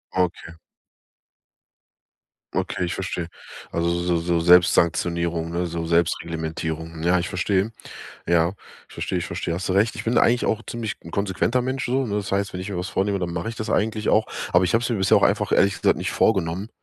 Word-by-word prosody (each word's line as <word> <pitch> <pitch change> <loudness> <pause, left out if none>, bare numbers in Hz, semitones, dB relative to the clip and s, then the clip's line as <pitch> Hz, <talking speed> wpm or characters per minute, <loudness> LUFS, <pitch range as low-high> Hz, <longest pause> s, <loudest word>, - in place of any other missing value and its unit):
Okay. 90 -2 -1 2.0
Okay, 90 - -1
ich 85 - -3
verstehe. 90 -3 -3 0.4
Also, 85 0 0
so 85 0 0
so 85 0 0
Selbstsanktionierung, 85 -1 +3
ne? 85 +1 -1
So 85 0 -4
Selbstreglementierung. 80 -1 -2
Ja, 90 +1 +3
ich 85 - -2
verstehe. 95 +4 0 0.5
Ja, 85 +1 +3 0.3
ich - - -19
verstehe, 90 - -2
ich 85 - -3
verstehe. 85 -1 -3
Hast 95 +2 -3
du - - +2
recht. 105 +4 +2
Ich - - -6
bin 115 +1 +2
eigentlich 120 +1 +3
auch 110 +1 0
ziemlich 115 -3 -4
'n 85 - -10
konsequenter 100 +5 0
Mensch 130 +1 -2
so, 130 +2 +1
ne? 105 -1 -2
Das 100 -1 -3
heißt, 100 +1 0
wenn 90 - -5
ich 95 - -5
mir 100 - -4
was 90 +2 -3
vornehme, 100 0 0
dann 85 -2 -3
mache 85 +6 -3
ich 115 - -6
das 110 - -4
eigentlich 110 0 0
auch. 110 0 +3 0.3
Aber 90 +1 +5
ich 90 +4 0
habe 115 - +3
es 120 - -1
mir 120 - +1
bisher 95 -1 +4
auch - - +2
einfach - - +2
ehrlich 100 -1 +3
gesagt - - +3
nicht - - -3
vorgenommen, 95 0 +1
90 Hz, 205 wpm, -23 LUFS, 85-105 Hz, 2.0 s, Aber